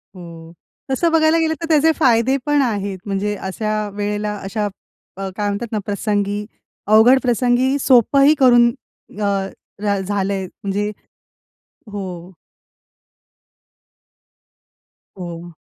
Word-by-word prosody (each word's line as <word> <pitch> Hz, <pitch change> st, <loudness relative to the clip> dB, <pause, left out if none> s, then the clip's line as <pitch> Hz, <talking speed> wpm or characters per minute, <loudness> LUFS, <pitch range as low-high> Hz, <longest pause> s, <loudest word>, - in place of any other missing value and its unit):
हो, 170 Hz, -2 st, -11 dB, 0.4 s
तसं 330 Hz, +5 st, +1 dB
बघायला 320 Hz, 0 st, +3 dB
गेलं 320 Hz, -1 st, +1 dB
तर 330 Hz, -, -3 dB
त्याचे 315 Hz, 0 st, +4 dB
फायदे 255 Hz, 0 st, +3 dB
पण 295 Hz, -1 st, +2 dB
आहेत. 200 Hz, -6 st, -2 dB
म्हणजे 205 Hz, +1 st, -2 dB
अशा 215 Hz, +2 st, -3 dB
वेळेला 210 Hz, 0 st, -3 dB
अशा 210 Hz, +2 st, -2 dB, 0.5 s
अ, 195 Hz, 0 st, -4 dB
काय 205 Hz, -1 st, -1 dB
म्हणतात 215 Hz, +3 st, -4 dB
ना 215 Hz, -, -1 dB
प्रसंगी, 205 Hz, 0 st, -2 dB, 0.4 s
अवघड 220 Hz, +5 st, +6 dB
प्रसंगी 250 Hz, +2 st, +1 dB
सोपंही 275 Hz, +3 st, +5 dB
करून 240 Hz, -2 st, +6 dB, 0.5 s
अ, -, -, 0 dB, 0.6 s
र 200 Hz, -1 st, +1 dB
झालंय 195 Hz, -1 st, -1 dB
म्हणजे 200 Hz, +2 st, -4 dB, 1.0 s
हो. 185 Hz, -3 st, -7 dB, 2.9 s
हो. 175 Hz, -1 st, -8 dB
210 Hz, 105 wpm, -19 LUFS, 195-255 Hz, 2.9 s, अवघड